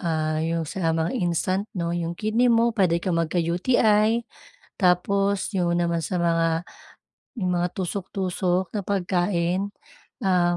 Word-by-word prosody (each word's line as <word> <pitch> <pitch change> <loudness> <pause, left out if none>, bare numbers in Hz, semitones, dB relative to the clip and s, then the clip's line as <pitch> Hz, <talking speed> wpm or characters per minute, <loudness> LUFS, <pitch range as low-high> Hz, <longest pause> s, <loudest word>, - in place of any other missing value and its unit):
ah, 155 -3 -1
yung 165 +1 -1
sa 165 +1 -1
mga 165 +1 0
instant 185 +1 0
'no, 170 -2 -2
'yong 170 0 -2
kidney 220 +4 +1
mo 235 0 +4
pwede 185 -6 +2
kang 175 -3 0
magka-UTI. 210 +7 +2 0.5
Tapos 195 +2 +1
yung 175 -2 +1
naman 170 -1 0
sa 185 - -2
mga 165 -1 +2 0.9
mga 180 -2 +1
tusok-tusok 185 0 -2
na 205 - 0
pagkain, 185 0 0 0.5
um, 175 -2 +2
180 Hz, 125 wpm, -24 LUFS, 170-200 Hz, 0.9 s, mo